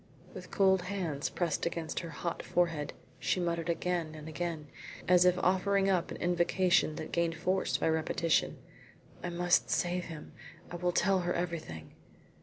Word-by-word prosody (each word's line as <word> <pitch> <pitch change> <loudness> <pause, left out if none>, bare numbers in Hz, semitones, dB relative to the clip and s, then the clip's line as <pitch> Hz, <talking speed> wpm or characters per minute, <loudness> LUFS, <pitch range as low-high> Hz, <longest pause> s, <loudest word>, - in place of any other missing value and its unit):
With - - -9
cold 190 -2 +4
hands 175 -6 -2
pressed 170 -2 -1
against 165 -1 -3
her 170 - -6
hot 170 +1 -4
forehead, 165 -4 0 0.3
she - - 0
muttered 170 -1 -1
again 170 -1 -1
and 155 0 -9
again, 160 -1 -4 0.4
as 180 0 +6
if 180 0 +4
offering 195 +2 +2
up 180 -2 +1
an - - -6
invocation 175 -2 +2
that - - -6
gained 170 -1 +1
force 185 +4 0
by - - 0
repetition: 160 0 +1 0.6
"I 175 - -3
must 175 +1 +2
save 180 0 0
him. 160 -2 -9 0.4
I 175 - -4
will 180 0 0
tell 190 +2 +3
her 175 0 -1
everything." 160 - -4
175 Hz, 160 wpm, -31 LUFS, 165-180 Hz, 0.6 s, as